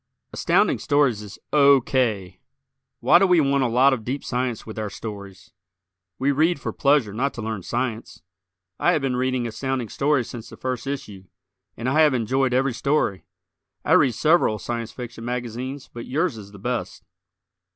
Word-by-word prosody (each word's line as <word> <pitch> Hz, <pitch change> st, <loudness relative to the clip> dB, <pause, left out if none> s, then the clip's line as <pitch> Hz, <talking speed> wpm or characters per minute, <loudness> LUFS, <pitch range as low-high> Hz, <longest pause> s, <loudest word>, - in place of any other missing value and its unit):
Astounding -, -, +2 dB
Stories 140 Hz, -7 st, +2 dB
is 105 Hz, -1 st, -10 dB, 0.2 s
O. 140 Hz, -2 st, +6 dB
K. 110 Hz, -8 st, -1 dB, 0.6 s
Why 130 Hz, +8 st, +6 dB
do 195 Hz, -, +4 dB
we 180 Hz, -2 st, +5 dB
want 140 Hz, -2 st, +2 dB
a -, -, +2 dB
lot 130 Hz, +4 st, +4 dB
of 115 Hz, -4 st, -3 dB
deep 130 Hz, +5 st, -4 dB
science 125 Hz, -2 st, -2 dB
with 110 Hz, 0 st, -7 dB
our 105 Hz, -1 st, -3 dB
stories? 100 Hz, -3 st, -9 dB, 0.7 s
We 135 Hz, +2 st, +1 dB
read 155 Hz, +3 st, +2 dB
for -, -, -4 dB
pleasure 140 Hz, -7 st, +2 dB
not 135 Hz, +6 st, -1 dB
to 120 Hz, -, -5 dB
learn 110 Hz, -2 st, -3 dB
science. 120 Hz, +1 st, -4 dB, 0.6 s
I 175 Hz, -, +3 dB
have 155 Hz, -5 st, 0 dB
been 130 Hz, -2 st, 0 dB
reading 130 Hz, -1 st, 0 dB
Astounding 125 Hz, +1 st, -3 dB
Stories 140 Hz, -1 st, +1 dB
since 120 Hz, -2 st, -8 dB
the -, -, -12 dB
first 130 Hz, 0 st, -4 dB
issue, 105 Hz, -9 st, -6 dB, 0.5 s
and 120 Hz, -, -4 dB
I 140 Hz, +4 st, +2 dB
have 150 Hz, -4 st, +4 dB
enjoyed 130 Hz, +3 st, +1 dB
every 130 Hz, +1 st, +1 dB
story. 140 Hz, -7 st, 0 dB, 0.6 s
I -, -, -1 dB
read 125 Hz, -5 st, +5 dB
several 155 Hz, -8 st, +3 dB
Science 115 Hz, +1 st, -4 dB
Fiction 120 Hz, -1 st, -8 dB
magazines 125 Hz, +3 st, -5 dB
but 120 Hz, 0 st, -8 dB
yours 150 Hz, +1 st, 0 dB
is 100 Hz, -2 st, -11 dB
the 100 Hz, -, -12 dB
best. 100 Hz, -3 st, -4 dB
125 Hz, 175 wpm, -23 LUFS, 110-140 Hz, 0.7 s, O